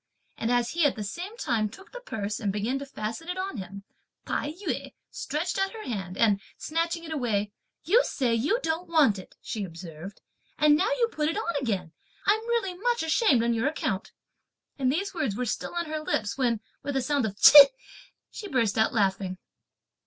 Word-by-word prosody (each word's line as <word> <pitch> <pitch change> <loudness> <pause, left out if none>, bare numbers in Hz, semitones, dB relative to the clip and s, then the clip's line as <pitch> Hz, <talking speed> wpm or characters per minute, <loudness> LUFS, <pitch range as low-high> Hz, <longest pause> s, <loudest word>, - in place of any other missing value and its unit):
and 225 - -2
as 245 -1 +2
he, 340 0 +1
at 290 - +3
the 215 - -4
same 360 - -6
time, 230 - 0
took 385 - -14
the - - -7
purse 215 - -4
and 205 -3 -1
began 220 +7 -1
to 280 - -7
fasten 230 +6 -5
it 360 - -3
on 380 -5 -3
him, 195 +1 -7 0.4
Tai 290 - -2
yü 370 +3 -4 0.2
stretched 320 +7 -2
out 390 0 0
her 445 -1 -8
hand, 190 -6 -5
and 205 -3 +3 0.2
snatching 335 +1 -2
it 320 - -8
away, 220 -8 -1 0.3
"You 425 - +4
say 250 -4 0
you 285 - +1
don't 325 +2 -2
want 290 - +4
it," 185 - -13
she 215 - -4
observed, 170 +1 -9 0.4
"and 300 -1 +5
now 375 +8 +2
you 470 -2 +3
put 300 0 0
it 330 - -2
on 385 -7 -2
again! 190 -9 -2 0.3
I'm 425 +2 +3
really 465 -6 0
much 475 +3 0
ashamed 320 - +3
on 235 0 +2
your 230 +3 +1
account!" 245 -10 -2 0.7
And 260 -1 +2
these 390 +8 -2
words 290 - -1
were 250 - -2
still 240 - -3
on 345 0 -1
her 310 0 -3
lips 215 -9 -1
when 240 -5 0 0.2
with 285 -1 -4
a - - +1
sound 275 -3 +1
of 200 - -6
Ch'ih, 280 +6 +10 0.6
she 415 - -7
burst 230 - +1
out 220 - +3
laughing. 190 -3 0
270 Hz, 200 wpm, -27 LUFS, 215-340 Hz, 0.7 s, Ch'ih